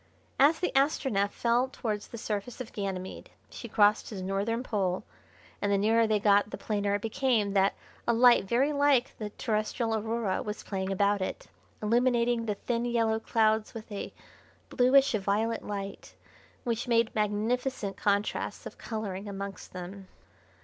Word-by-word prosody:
As 300 +4 +5
the 360 - 0
Astronef 270 -8 +2
fell 240 +4 +1
towards 215 -6 -4
the 235 - -8
surface 215 +2 -4
of 250 -3 -7
Ganymede 190 -2 -5 0.2
she 235 - -8
crossed 210 0 +3
his 195 -4 -6
northern 200 +5 -1
pole, 190 -6 -1 0.6
and 205 - +1
the 200 - +3
nearer 225 +3 +3
they 215 -1 +2
got 205 0 +4
the - - -6
plainer 205 -1 -1
it 205 - -4
became 225 -3 +1
that 195 0 +3 0.3
a - - +5
light 240 -2 +6
very 260 +8 +2
like 280 -3 +3
the 210 -1 -4
terrestrial 220 +1 -1
Aurora 220 -2 -1
was 210 0 -5
playing 190 -1 -3
about 200 +1 +2
it, 185 - -4 0.3
illuminating 235 +1 +2
the 210 - 0
thin, 235 +3 -2
yellow 230 -2 +1
clouds 220 0 +1
with 225 0 -8
a 200 - -5 0.6
bluish 270 +3 +4
violet 215 +2 0
light, 200 -1 -6 0.5
which 235 0 -2
made 230 -1 +2
magnificent 215 +1 -1
contrasts 205 0 -1
of - - -9
colouring 205 -3 -5
amongst 195 -1 -7
them. 185 +2 -8
215 Hz, 155 wpm, -29 LUFS, 200-235 Hz, 0.6 s, light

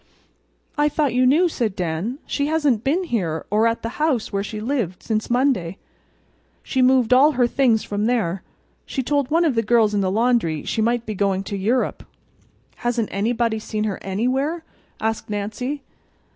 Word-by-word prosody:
"I 295 0 +4
thought 295 -3 0
you 255 +1 +3
knew," 320 +7 +4
said 230 - -2
Dan. 180 +7 -2
"She 285 0 -1
hasn't 295 -8 +1
been 325 +8 +1
here 180 - -2
or 215 +2 +3
at 230 0 -2
the 230 +6 -5
house 270 -10 0
where 200 0 0
she 210 +1 -6
lived 220 -6 -2
since 215 -1 -2
Monday. 240 -9 +1 0.9
She 260 - 0
moved 255 -1 +4
all 285 +4 +6
her 245 -2 +3
things 240 -3 +2
from 205 +1 -2
there. 195 -7 0 0.5
She 265 - -2
told 285 0 0
one 335 +2 +3
of 305 - +2
the 225 - +2
girls 225 -1 +3
in 205 - +1
the 190 - +1
laundry 215 -7 +1
she 220 - -1
might 235 +1 +1
be 215 - -4
going 195 -1 0
to 200 - -5
Europe." 225 +6 0 0.8
"Hasn't 240 -2 -1
anybody 225 +2 0
seen 215 0 -3
her 210 -3 -2
anywhere?" 260 - -1 0.4
asked 220 0 -2
Nancy. 220 +7 -3
230 Hz, 175 wpm, -22 LUFS, 205-265 Hz, 0.9 s, all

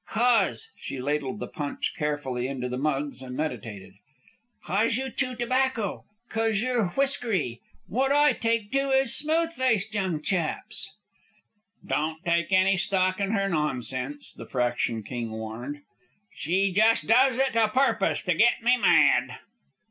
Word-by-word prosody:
"Cos.. 245 - +2
." - - -38
She 135 - -6
ladled 150 +9 -2
the - - -5
punch 145 -2 -4
carefully 140 -5 -2
into 130 -2 -4
the 125 0 -4
mugs 140 -1 -2
and 125 -1 -7
meditated. 110 -10 -5 0.7
"Cos 220 +5 +1
you 265 0 -3
chew 255 -1 -2
tobacco. 245 -3 -1 0.2
Cos 225 -2 0
you're 240 -3 +1
whiskery. 225 - 0 0.3
Wot 265 +6 0
I 295 +1 +5
take 230 -2 -1
to 275 0 +1
is 265 -2 +4
smooth 325 +2 +2
faced 225 - 0
young 190 -6 -1
chaps." 170 +3 -2 1.0
"Don't 155 +1 -1
take 170 0 +1
any 190 0 +4
stock 185 0 +1
in 200 +1 -1
her 195 -2 +1
nonsense," 145 -4 -3
the - - -10
Fraction 120 -3 -1
King 120 0 -5
warned, 110 +6 -6 0.5
"She 190 +5 0
just 220 +4 +3
does 255 +2 +4
it 265 -2 +1
a 225 -1 +4
purpose 260 +6 +1
to - - +1
get - - +3
me 245 +2 +4
mad." 160 - +4
195 Hz, 150 wpm, -26 LUFS, 140-240 Hz, 1.0 s, I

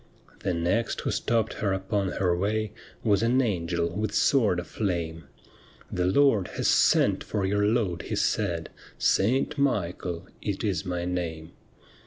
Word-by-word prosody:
The 90 -3 -1
next 90 +8 0
who - - -1
stopped 115 -2 0
her 100 -2 +1
upon 95 0 -1
her 90 -2 +1
way 105 +3 -1 0.3
Was 100 -3 +3
an 120 +3 +3
angel 85 -8 0
with 105 0 -2
sword 105 -5 +3
aflame: 85 -4 -3 0.3
' - - -26
The 90 0 0
Lord 110 -3 +4
has - - +1
sent - - +4
for 100 -3 -2
your 105 +1 +2
load/ 105 -7 0
he - - -1
said, - - 0 0.2
' - - -24
Saint 130 +8 +2
Michael 90 -8 -1 0.2
it 100 -2 -3
is 95 -6 -1
my 90 -1 -2
name.' 85 -3 -3
95 Hz, 155 wpm, -27 LUFS, 90-110 Hz, 0.3 s, Lord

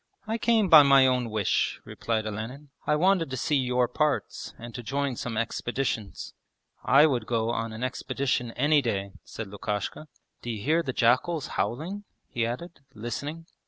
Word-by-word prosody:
'I 220 +1 -2
came 225 -4 +3
by 160 -4 +10
my 140 -2 +6
own 125 -2 +1
wish,' 105 -3 0
replied 110 -2 -2
Olenin. 115 +7 -6 0.2
'I 150 - +3
wanted 180 0 +2
to 130 - -4
see 150 +1 +1
your 125 -1 +1
parts 150 +4 -2
and 120 0 -9
to 120 - -6
join 140 +2 -2
some 115 -1 -4
expeditions.' 115 -1 -3 0.5
'I 140 +4 +6
would 125 -7 0
go 115 -1 0
on 115 -1 -2
an 110 +2 -6
expedition 130 -1 -1
any 145 +3 +3
day,' 100 -6 -2
said 115 - -7
Lukashka. 105 +8 -4 0.3
'D'you 115 -3 -4
hear 160 +4 +3
the 140 - -3
jackals 130 +7 +1
howling?' 175 - -3 0.2
he 115 -1 -1
added, 170 +9 -6 0.2
listening. 145 +9 -5
130 Hz, 160 wpm, -27 LUFS, 115-150 Hz, 0.5 s, by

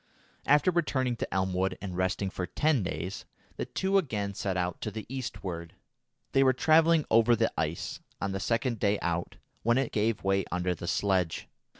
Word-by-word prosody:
After 145 +5 +5
returning 135 -8 0
to - - -4
Elmwood 95 0 0
and 95 -3 -5
resting 95 +1 0
for 90 -1 -4
ten 150 0 +2
days, 90 +1 -4 0.3
the - - -3
two 195 +1 +2
again 105 - -2
set 95 -1 -2
out 90 -1 -2
to - - -2
the 110 +1 -6
eastward. 95 -10 -5 0.6
They 135 - +4
were 130 -1 +5
travelling 160 +3 +4
over 115 +1 +5
the - - +1
ice, - - -2 0.2
on 100 - -2
the 95 - -2
second 115 +2 0
day 100 +1 +2
out, 85 0 -2 0.3
when 120 +2 +3
it 135 -2 0
gave 110 0 0
way 95 0 +2
under 90 0 0
the 85 - -7
sledge. 95 -5 0
100 Hz, 180 wpm, -29 LUFS, 95-130 Hz, 0.6 s, After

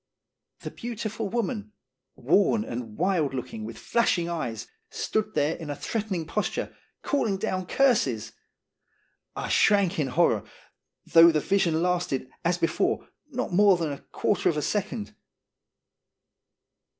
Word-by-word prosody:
The - - -6
beautiful 225 -3 -4
woman, 220 -2 -3 0.4
worn 200 - +2
and 115 -3 -6
wild 165 -6 +1
looking, 215 - -5
with - - -8
flashing 185 -7 +1
eyes, 125 -11 -3 0.2
stood 215 0 -2
there 150 +3 +1
in 160 -3 -8
a 145 - -2
threatening 195 0 -3
posture, - - -2 0.3
calling 225 -9 0
down 185 -1 -2
curses! 210 - +2 1.0
I - - -4
shrank 200 -4 +3
in 145 - +1
horror, 125 - +2 0.6
though 165 0 +7
the 155 - +1
vision 170 -2 +1
lasted, 175 -8 -1
as 175 +1 +1
before, 165 - 0 0.2
not 255 -8 -3
more 200 0 +6
than 165 -3 -2
a 140 - -6
quarter 205 - 0
of 155 - -1
a 150 - -1
second. 210 +1 -2
180 Hz, 130 wpm, -26 LUFS, 155-215 Hz, 1.0 s, though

